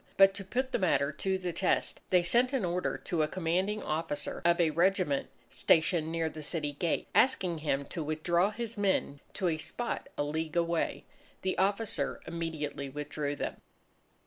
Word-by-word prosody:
But 195 Hz, 0 st, +7 dB
to 200 Hz, 0 st, -5 dB
put 255 Hz, +7 st, -2 dB
the -, -, +1 dB
matter 150 Hz, -6 st, +2 dB
to 190 Hz, +5 st, -1 dB
the 180 Hz, -2 st, -3 dB
test, 180 Hz, +2 st, +1 dB
they 180 Hz, -1 st, +4 dB
sent 245 Hz, +9 st, +3 dB
an 255 Hz, -8 st, +1 dB
order 180 Hz, +1 st, -1 dB
to 170 Hz, -4 st, 0 dB
a 155 Hz, -, +2 dB
commanding 185 Hz, +5 st, -1 dB
officer 155 Hz, -1 st, -3 dB
of 170 Hz, +1 st, +4 dB
a 165 Hz, -2 st, +4 dB
regiment 175 Hz, -3 st, +2 dB, 0.2 s
stationed 160 Hz, 0 st, +3 dB
near 165 Hz, -1 st, 0 dB
the 155 Hz, 0 st, -6 dB
city 150 Hz, -1 st, -2 dB
gate, 160 Hz, +3 st, -1 dB
asking 185 Hz, -10 st, +3 dB
him 140 Hz, -2 st, 0 dB
to 170 Hz, -, -5 dB
withdraw 170 Hz, +5 st, +1 dB
his 230 Hz, 0 st, -5 dB
men 190 Hz, -8 st, +1 dB, 0.2 s
to 190 Hz, -3 st, 0 dB
a 160 Hz, -2 st, 0 dB
spot 240 Hz, +9 st, -3 dB
a -, -, +1 dB
league 155 Hz, +2 st, -3 dB
away. 170 Hz, -1 st, 0 dB, 0.4 s
The 185 Hz, -, 0 dB
officer 195 Hz, -6 st, 0 dB
immediately 160 Hz, -4 st, -4 dB
withdrew 145 Hz, +1 st, -3 dB
them. -, -, -4 dB
170 Hz, 175 wpm, -31 LUFS, 155-190 Hz, 0.4 s, But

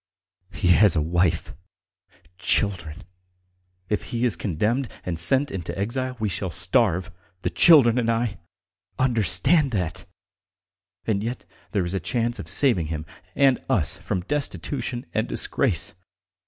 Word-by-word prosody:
He 95 Hz, -3 st, -1 dB
has 95 Hz, +1 st, +6 dB
a -, -, +2 dB
wife, 85 Hz, -3 st, 0 dB, 0.9 s
children.... 95 Hz, -3 st, -1 dB, 0.8 s
If 105 Hz, -, -2 dB
he 120 Hz, +1 st, -2 dB
is 120 Hz, -, +3 dB
condemned 110 Hz, -, -1 dB, 0.2 s
and 85 Hz, -3 st, -2 dB
sent 135 Hz, +11 st, +3 dB
into 95 Hz, -2 st, -5 dB
exile 125 Hz, +5 st, -3 dB
we 110 Hz, -, 0 dB
shall 95 Hz, -1 st, -3 dB
starve, 95 Hz, 0 st, +1 dB, 0.3 s
the -, -, -1 dB
children 130 Hz, -8 st, +6 dB
and 115 Hz, -1 st, 0 dB
I.... 115 Hz, -4 st, -1 dB, 0.6 s
Understand 130 Hz, -, +2 dB
that! 90 Hz, -2 st, -3 dB, 1.0 s
And 105 Hz, -2 st, 0 dB
yet 120 Hz, +2 st, -5 dB, 0.3 s
there 100 Hz, -5 st, 0 dB
is 85 Hz, -, -2 dB
a 95 Hz, -, 0 dB
chance 120 Hz, +1 st, -2 dB
of -, -, -7 dB
saving 115 Hz, -, +3 dB
him 80 Hz, -1 st, -5 dB, 0.3 s
and 135 Hz, -2 st, +3 dB
us 95 Hz, -, +1 dB
from 95 Hz, -4 st, -3 dB
destitution 135 Hz, +1 st, -3 dB
and -, -, 0 dB
disgrace. 85 Hz, 0 st, -1 dB
105 Hz, 135 wpm, -24 LUFS, 90-125 Hz, 1.0 s, has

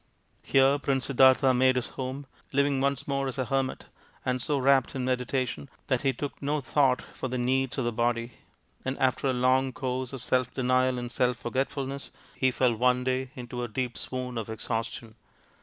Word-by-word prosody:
Here 135 Hz, +1 st, +4 dB
Prince 135 Hz, -2 st, 0 dB
Siddartha 130 Hz, 0 st, +5 dB
made 130 Hz, +1 st, +4 dB
his 125 Hz, -2 st, -1 dB
home, 130 Hz, +2 st, -5 dB, 0.3 s
living 140 Hz, -1 st, +2 dB
once 140 Hz, -1 st, 0 dB
more 140 Hz, -1 st, 0 dB
as 130 Hz, -, -4 dB
a 130 Hz, -, 0 dB
hermit, 135 Hz, +1 st, -1 dB, 0.4 s
and 125 Hz, -1 st, 0 dB
so 145 Hz, +3 st, 0 dB
wrapped 135 Hz, -1 st, +3 dB
in 130 Hz, -1 st, -2 dB
medita 130 Hz, 0 st, 0 dB
tion 140 Hz, -, -7 dB, 0.2 s
that 130 Hz, -2 st, +2 dB
he 135 Hz, -2 st, +2 dB
took 145 Hz, +1 st, -6 dB
no 145 Hz, +2 st, 0 dB
thought 135 Hz, -1 st, +2 dB
for -, -, -4 dB
the 125 Hz, 0 st, -3 dB
needs 130 Hz, +2 st, 0 dB
of 130 Hz, -, 0 dB
the 120 Hz, -, +1 dB
body; 120 Hz, +1 st, 0 dB, 0.5 s
and 130 Hz, +1 st, -2 dB
after 130 Hz, +1 st, +1 dB
a -, -, +3 dB
long 130 Hz, +1 st, +2 dB
course 130 Hz, 0 st, -3 dB
of 135 Hz, -2 st, -7 dB
self 125 Hz, -1 st, +1 dB
denial 130 Hz, 0 st, +2 dB
and 120 Hz, 0 st, -5 dB
self 125 Hz, 0 st, +1 dB
forgetfulness 135 Hz, +3 st, -3 dB, 0.2 s
he 130 Hz, -, +2 dB
fell 125 Hz, -1 st, +2 dB
one 125 Hz, +2 st, +2 dB
day 130 Hz, 0 st, -1 dB
into 125 Hz, -1 st, -6 dB
a 120 Hz, -, -2 dB
deep 120 Hz, +2 st, -3 dB
swoon 125 Hz, -2 st, -4 dB
of 110 Hz, -, -6 dB
exhaustion. 110 Hz, 0 st, -4 dB
130 Hz, 190 wpm, -28 LUFS, 125-135 Hz, 0.5 s, Siddartha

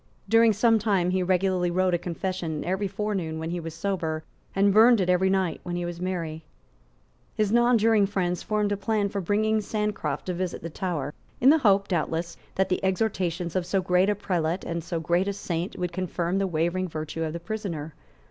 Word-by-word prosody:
During 225 Hz, +2 st, +5 dB
some 225 Hz, +2 st, +3 dB
time 195 Hz, -4 st, +1 dB
he 185 Hz, 0 st, +1 dB
regularly 185 Hz, 0 st, +1 dB
wrote 185 Hz, +1 st, +1 dB
a 175 Hz, -, +2 dB
confession 170 Hz, -3 st, -3 dB
every 190 Hz, +3 st, 0 dB
forenoon 195 Hz, -5 st, -3 dB
when 160 Hz, +1 st, -4 dB
he 175 Hz, -, -2 dB
was 165 Hz, -1 st, -7 dB
sober, 165 Hz, -4 st, -2 dB, 0.3 s
and 200 Hz, 0 st, +4 dB
burned 225 Hz, +2 st, +7 dB
it 180 Hz, -1 st, +2 dB
every 185 Hz, +1 st, +3 dB
night 190 Hz, -3 st, 0 dB
when 175 Hz, -1 st, -4 dB
he 175 Hz, 0 st, -2 dB
was 175 Hz, 0 st, -6 dB
merry. 165 Hz, -4 st, -3 dB, 0.9 s
His 210 Hz, -2 st, +1 dB
nonjuring 225 Hz, -3 st, +4 dB
friends 180 Hz, -3 st, -1 dB
formed 210 Hz, -1 st, 0 dB
a 205 Hz, -, 0 dB
plan 205 Hz, 0 st, 0 dB
for 200 Hz, 0 st, -3 dB
bringing 215 Hz, +4 st, +1 dB
Sancroft 210 Hz, -9 st, -2 dB
to 185 Hz, -, -2 dB
visit 180 Hz, -1 st, -3 dB
the 165 Hz, -, -5 dB
Tower, 155 Hz, -5 st, -3 dB, 0.3 s
in 260 Hz, +4 st, +7 dB
the 320 Hz, -, +4 dB
hope, 200 Hz, -5 st, +3 dB
doubtless, 170 Hz, -1 st, -1 dB, 0.2 s
that 190 Hz, 0 st, +2 dB
the 185 Hz, -, -1 dB
exhortations 185 Hz, -3 st, -1 dB
of 185 Hz, -, +1 dB
so 190 Hz, +3 st, 0 dB
great 180 Hz, +1 st, +2 dB
a 210 Hz, -, +2 dB
prelate 175 Hz, -3 st, -1 dB
and 170 Hz, -1 st, -3 dB
so 170 Hz, 0 st, -3 dB
great 175 Hz, +4 st, +1 dB
a 200 Hz, -, 0 dB
saint 175 Hz, -2 st, -4 dB
would 180 Hz, -1 st, -3 dB
confirm 180 Hz, 0 st, -1 dB
the 195 Hz, -, +1 dB
wavering 175 Hz, +2 st, 0 dB
virtue 155 Hz, 0 st, -5 dB
of 160 Hz, -1 st, -2 dB
the 170 Hz, -, -4 dB
prisoner. 170 Hz, -6 st, -5 dB
185 Hz, 200 wpm, -26 LUFS, 170-200 Hz, 0.9 s, burned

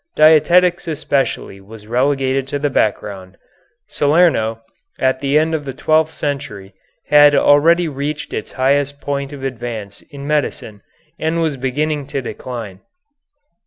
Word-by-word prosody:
Dietetics 175 Hz, +4 st, +4 dB
especially 140 Hz, -9 st, -2 dB
was 105 Hz, +2 st, -13 dB
relegated 135 Hz, +2 st, 0 dB
to 145 Hz, -, -3 dB
the 145 Hz, 0 st, -1 dB
background. 100 Hz, -5 st, -2 dB, 0.5 s
Salerno, 140 Hz, -8 st, +2 dB, 0.3 s
at 130 Hz, 0 st, +1 dB
the 140 Hz, +1 st, +1 dB
end 160 Hz, +1 st, +1 dB
of 155 Hz, -2 st, -2 dB
the 135 Hz, -2 st, -7 dB
twelfth 155 Hz, +2 st, +2 dB
century, 140 Hz, -11 st, -5 dB, 0.4 s
had 145 Hz, 0 st, +7 dB
already 165 Hz, +5 st, +4 dB
reached 145 Hz, +1 st, -5 dB
its -, -, -5 dB
highest 140 Hz, +2 st, 0 dB
point 140 Hz, 0 st, -3 dB
of 140 Hz, -2 st, -9 dB
advance 120 Hz, -5 st, -6 dB
in 140 Hz, -2 st, -9 dB
medicine 140 Hz, -8 st, -2 dB, 0.4 s
and 160 Hz, +1 st, -1 dB
was 160 Hz, -3 st, 0 dB
beginning 140 Hz, +3 st, -2 dB
to 140 Hz, -, -3 dB
decline. 115 Hz, -5 st, -7 dB
140 Hz, 130 wpm, -18 LUFS, 125-150 Hz, 0.5 s, had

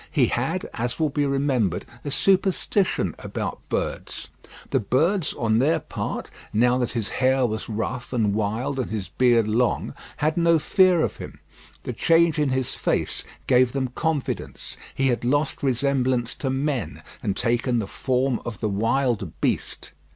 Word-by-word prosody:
He -, -, +3 dB
had, -, -, -1 dB
as 120 Hz, +5 st, -3 dB
will 155 Hz, -2 st, +1 dB
be 145 Hz, 0 st, +1 dB
remembered, 135 Hz, -, 0 dB, 0.2 s
a -, -, -3 dB
superstition 190 Hz, -, +2 dB
about -, -, -4 dB
birds. -, -, -3 dB, 0.4 s
The 135 Hz, -, +3 dB
birds 155 Hz, -, +1 dB
on 110 Hz, -1 st, +1 dB
their 160 Hz, +5 st, +3 dB
part -, -, -5 dB, 0.2 s
now 125 Hz, +3 st, +3 dB
that 125 Hz, -, -1 dB
his 115 Hz, -4 st, -1 dB
hair 130 Hz, 0 st, +2 dB
was 110 Hz, -1 st, -3 dB
rough 115 Hz, +3 st, -3 dB
and 110 Hz, -5 st, +1 dB
wild 110 Hz, +6 st, -1 dB
and 130 Hz, -, -2 dB
his 105 Hz, -4 st, -4 dB
beard 120 Hz, -3 st, +3 dB
long 115 Hz, +2 st, +1 dB, 0.2 s
had 155 Hz, +2 st, 0 dB
no 170 Hz, -1 st, +4 dB
fear 180 Hz, +2 st, +4 dB
of -, -, -1 dB
him. -, -, -9 dB, 0.4 s
The -, -, -4 dB
change 165 Hz, -1 st, +3 dB
in 150 Hz, -2 st, +2 dB
his 130 Hz, -1 st, -1 dB
face -, -, -1 dB, 0.2 s
gave 125 Hz, -1 st, +4 dB
them 135 Hz, -2 st, -1 dB
confidence; 160 Hz, -3 st, -3 dB, 0.2 s
he 135 Hz, 0 st, +2 dB
had 120 Hz, -, 0 dB
lost 145 Hz, +4 st, 0 dB
resemblance 130 Hz, -2 st, +1 dB
to 135 Hz, -, -3 dB
men, 135 Hz, 0 st, -2 dB, 0.2 s
and 100 Hz, -, -2 dB
taken 120 Hz, +1 st, +1 dB
the 110 Hz, -, 0 dB
form 130 Hz, +4 st, 0 dB
of 110 Hz, -3 st, -6 dB
the 110 Hz, -, -1 dB
wild 115 Hz, -, 0 dB
beast. -, -, -2 dB
130 Hz, 160 wpm, -24 LUFS, 115-145 Hz, 0.4 s, no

